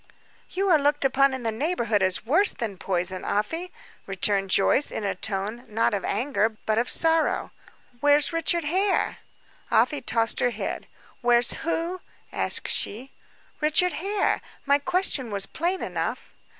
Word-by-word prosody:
"You 390 +2 -1
are 320 -4 +5
looked 290 0 +1
upon 275 +1 +3
in 260 -2 -5
the 225 - 0
neighborhood 235 - 0
as 185 +2 +1
worse 345 - +3
than 205 -6 -5
poison, 185 0 -1
Afy," 325 - -2 0.4
returned 195 0 0
Joyce, 200 +9 +3
in - - -4
a 195 -1 -1
tone, 205 +5 -3
not 225 +1 0
of 200 - -2
anger 225 -5 0
but 220 0 +1
of 240 - -1
sorrow. 325 -1 +2 0.5
"Where's 290 +2 +4
Richard 330 +1 +1
Hare?" 380 +6 0 0.5
Afy 240 +5 +2
tossed 230 -1 0
her 245 - +3
head. - - -5 0.3
"Where's 240 0 +3
who?" 335 +2 -3 0.3
asked - - -1
she. 245 +6 -2 0.5
"Richard 320 +4 +2
Hare. 400 +4 0 0.2
My 280 0 +3
question 330 - -1
was 200 -2 0
plain 355 +3 -2
enough." - - -4
260 Hz, 150 wpm, -25 LUFS, 215-325 Hz, 0.5 s, are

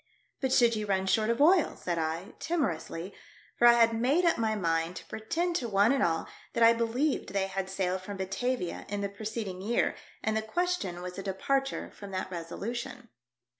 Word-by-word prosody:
" - - -43
But 265 -2 0
should 235 -3 +5
you 215 -1 -3
run 190 -1 +1
short 215 +3 +2
of 235 - +1
oil 335 +3 +5
!" - - -18
said 175 -2 -2
I, 165 +7 -3
timorously, 195 - -2 0.5
for 240 - +7
I 240 - +9
had 230 -1 +5
made 265 +10 +2
up 335 - +4
my 220 -1 +1
mind 165 -2 0
to - - -8
pretend 335 +11 -2
to 240 -6 -3
one 200 +3 +4
and 275 -1 +2
all 165 -1 +1 0.3
that 235 - +2
I 230 0 +8
believed 235 +1 0
they 195 -1 +1
had 195 0 -3
sailed 190 -1 -1
from 200 +1 -7
Batavia 195 +1 -2
in 205 0 -2
the 200 - -1
preceding 210 -2 -5
year, 225 +5 +1 0.3
and 220 - 0
the 220 - +1
question 220 - -2
was 180 +1 -6
a - - -3
departure 270 +8 -1
from 200 - -10
that 185 0 -3
resolution. 235 +8 -5
215 Hz, 205 wpm, -30 LUFS, 190-245 Hz, 0.5 s, I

